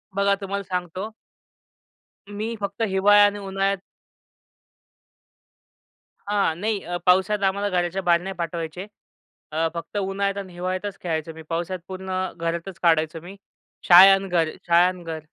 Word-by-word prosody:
बघा 200 Hz, 0 st, +3 dB
तुम्हाला 200 Hz, +1 st, -3 dB
सांगतो. 185 Hz, +3 st, -4 dB, 1.2 s
मी 215 Hz, +3 st, -4 dB
फक्त 200 Hz, +2 st, -5 dB
हिवाळा 205 Hz, +2 st, +5 dB
आणि 205 Hz, 0 st, 0 dB
उन्हाळ्यात 195 Hz, 0 st, -1 dB, 2.5 s
हां. 200 Hz, -6 st, +1 dB
नाही 210 Hz, 0 st, -1 dB
अ, 175 Hz, 0 st, -3 dB
पावसाळ्यात 190 Hz, +3 st, +3 dB
आम्हाला 200 Hz, +1 st, -1 dB
घराच्या 180 Hz, +1 st, -1 dB
बाहेर 170 Hz, -1 st, +3 dB
नाही 195 Hz, +1 st, -5 dB
पाठवायचे. 170 Hz, +1 st, -4 dB, 0.7 s
अ, 160 Hz, +1 st, +1 dB
फक्त 170 Hz, +4 st, -6 dB
उन्हाळ्यात 200 Hz, 0 st, -1 dB
आणि 185 Hz, -2 st, -14 dB
हिवाळ्यातच 185 Hz, +3 st, -4 dB
खेळायचो 160 Hz, -2 st, -3 dB
मी. 160 Hz, -, -11 dB
पावसात 175 Hz, +2 st, -3 dB
पूर्ण 190 Hz, 0 st, -7 dB, 0.3 s
घरातच 170 Hz, +2 st, -4 dB
काढायचो 160 Hz, -1 st, +2 dB
मी. 185 Hz, +3 st, -11 dB, 0.5 s
शाळा 185 Hz, +2 st, +10 dB
आणि 195 Hz, 0 st, 0 dB
घर, 165 Hz, -3 st, +2 dB, 0.2 s
शाळा 170 Hz, +1 st, +5 dB
आणि 180 Hz, -1 st, -5 dB
घर. 160 Hz, -1 st, -5 dB
185 Hz, 135 wpm, -23 LUFS, 170-200 Hz, 2.5 s, शाळा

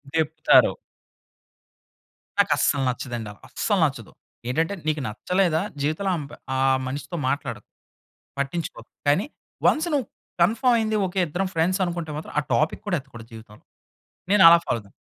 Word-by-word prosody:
దెప్పుతారు. 155 Hz, 0 st, +4 dB, 1.7 s
నాకస్సలు 140 Hz, -, +3 dB
నచ్చదండి. 120 Hz, -4 st, -4 dB, 0.2 s
అస్సలు -, -, 0 dB
నచ్చదు. -, -, -4 dB, 0.4 s
ఏంటంటే, 160 Hz, +8 st, 0 dB
నీకు 155 Hz, -1 st, 0 dB
నచ్చలేదా 165 Hz, -, 0 dB, 0.2 s
జీవితంలో 160 Hz, +7 st, 0 dB
అంపై 145 Hz, -2 st, -8 dB, 0.2 s
ఆ -, -, 0 dB, 0.3 s
మనిషితో 145 Hz, +5 st, -5 dB
మాట్లాడకు, 140 Hz, +2 st, -4 dB, 0.7 s
పట్టించుకోకు. 155 Hz, +4 st, -4 dB, 0.2 s
కానీ 150 Hz, +8 st, +3 dB, 0.4 s
వన్స్ 315 Hz, +3 st, +2 dB
నువ్వు 265 Hz, -7 st, 0 dB, 0.3 s
కన్ఫర్మ్ 230 Hz, +7 st, +3 dB
అయింది. 220 Hz, -1 st, 0 dB
ఓకె, 185 Hz, +1 st, -2 dB
ఇద్దరం 185 Hz, +5 st, -2 dB
ఫ్రెండ్స్ 180 Hz, +4 st, +1 dB
అనుకుంటే 170 Hz, -3 st, -4 dB
మాత్రం, 155 Hz, -, -8 dB
ఆ -, -, 0 dB
టాపిక్ 155 Hz, -, 0 dB
కూడా 180 Hz, -4 st, +1 dB
ఎత్తకూడదు 115 Hz, -3 st, -13 dB
జీవితంలో. 110 Hz, -1 st, -13 dB, 0.7 s
నేనలా 170 Hz, -5 st, +9 dB
ఫాలో 120 Hz, -, 0 dB
అవుతాను. 100 Hz, -1 st, -18 dB
160 Hz, 125 wpm, -24 LUFS, 140-185 Hz, 1.7 s, నేనలా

